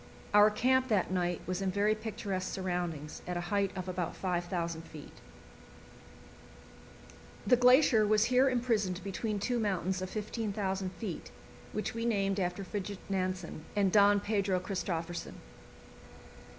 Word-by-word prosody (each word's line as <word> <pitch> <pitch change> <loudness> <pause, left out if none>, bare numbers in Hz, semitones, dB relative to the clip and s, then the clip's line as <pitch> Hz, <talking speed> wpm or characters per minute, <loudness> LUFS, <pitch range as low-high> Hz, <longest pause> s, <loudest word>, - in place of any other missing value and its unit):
Our 210 +1 +8
camp 255 +4 +2
that 205 -6 +1
night 175 -2 0
was 185 +2 -2
in 195 - 0
very 205 +3 +2
picturesque 200 -4 -4
surroundings, 175 -5 -3
at 180 0 -2
a 175 +2 -5
height 200 -1 +2
of 185 0 -4
about 180 -2 -3
5,000 175 -2 -2
feet. 155 -3 -11 2.3
The 225 - +6
glacier 250 -3 +5
was 215 0 +4
here 255 +2 +4
imprisoned 220 -8 0
between 205 +2 -2
two 240 +4 -1
mountains 190 -3 -1
of 185 - -4
15,000 200 -3 -3
feet, 200 -8 -6 0.4
which 215 - -3
we 230 0 -3
named 200 -3 +1
after 180 +1 -2
Fridtjof 200 +1 -4
Nansen 185 -4 -2
and 200 -2 +3
Don 205 0 +6
Pedro 200 -3 0
Christophersen. 175 -3 -4
195 Hz, 135 wpm, -31 LUFS, 180-215 Hz, 2.3 s, Our